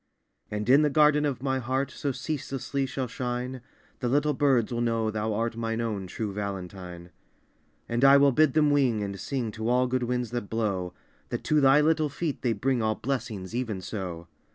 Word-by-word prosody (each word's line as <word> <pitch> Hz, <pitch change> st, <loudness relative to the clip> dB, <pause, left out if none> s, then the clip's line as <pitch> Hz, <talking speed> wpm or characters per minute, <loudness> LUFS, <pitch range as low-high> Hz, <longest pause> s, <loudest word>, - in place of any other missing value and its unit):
And 105 Hz, +1 st, -3 dB
in 135 Hz, +4 st, +6 dB
the 150 Hz, -, +3 dB
garden 150 Hz, 0 st, +4 dB
of 135 Hz, -3 st, -2 dB
my 130 Hz, -1 st, 0 dB
heart 130 Hz, +2 st, -1 dB
So 140 Hz, -, -2 dB
ceaselessly 135 Hz, 0 st, -3 dB
shall 130 Hz, 0 st, -3 dB
shine, 125 Hz, +1 st, -4 dB, 0.4 s
The 125 Hz, -, -1 dB
little 145 Hz, +3 st, +2 dB
birds 130 Hz, -5 st, +2 dB
will 120 Hz, -, -1 dB
know 115 Hz, -2 st, 0 dB
thou 110 Hz, +1 st, -2 dB
art 115 Hz, +1 st, -1 dB
Mine 115 Hz, 0 st, -2 dB
own 105 Hz, -5 st, -2 dB
true 105 Hz, +2 st, -4 dB
Valentine. 90 Hz, -3 st, -6 dB, 0.8 s
And 120 Hz, +2 st, -1 dB
I 140 Hz, 0 st, +8 dB
will 140 Hz, 0 st, +5 dB
bid 150 Hz, +1 st, +3 dB
them 150 Hz, -2 st, +4 dB
wing 125 Hz, -7 st, +2 dB
and 100 Hz, -1 st, -5 dB
sing 125 Hz, -3 st, -3 dB
To 110 Hz, +2 st, -3 dB
all 125 Hz, +1 st, +3 dB
good 130 Hz, 0 st, -1 dB
winds 125 Hz, -1 st, -2 dB
that 120 Hz, -4 st, -4 dB
blow, 95 Hz, -6 st, -2 dB, 0.3 s
That -, -, -4 dB
to 150 Hz, -1 st, +2 dB
thy 135 Hz, +2 st, +6 dB
little 155 Hz, 0 st, +2 dB
feet 150 Hz, +1 st, -3 dB
they 120 Hz, -3 st, +1 dB
bring 125 Hz, +3 st, 0 dB
All 110 Hz, 0 st, +1 dB
blessings, 110 Hz, -7 st, -4 dB
even 115 Hz, -5 st, -2 dB
so. 90 Hz, -4 st, -6 dB
120 Hz, 195 wpm, -27 LUFS, 110-135 Hz, 0.8 s, I